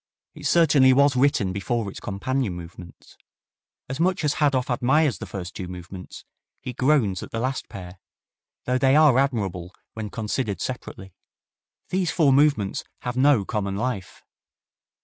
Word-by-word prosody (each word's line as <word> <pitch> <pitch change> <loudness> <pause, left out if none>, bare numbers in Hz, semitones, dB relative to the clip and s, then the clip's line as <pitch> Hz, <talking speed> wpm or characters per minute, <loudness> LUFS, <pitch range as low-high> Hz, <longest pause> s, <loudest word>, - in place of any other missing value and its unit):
It 150 -1 -5
certainly 145 -5 +5
was 140 +1 +4
written 125 -8 +2
before 110 +3 -2
its 100 - -7
companion 115 +2 -2
movements. 85 0 -12 0.7
As 135 +3 -5
much 180 0 +1
as 145 -1 +2
Hadow 140 -4 +2
admires 130 +2 +2
the - - -7
first 90 -2 -6
two 95 - -5
movements, 90 +1 -9 0.3
he 125 - -6
groans 125 -8 +2
at - - -8
the 115 - -4
last 130 +3 -3
pair, 90 -1 -9 0.7
though 125 +1 +1
they 135 +1 +4
are 150 -4 +6
admirable 95 -10 -2 0.2
when 110 -1 -5
considered 105 -2 -3
separately. 95 -6 -6 0.8
These 185 -2 0
four 155 -6 +3
movements 140 -8 +2 0.2
have 125 -1 -3
no 130 -5 +4
common 100 -3 -2
life. 105 -3 -4
125 Hz, 150 wpm, -24 LUFS, 95-140 Hz, 0.8 s, are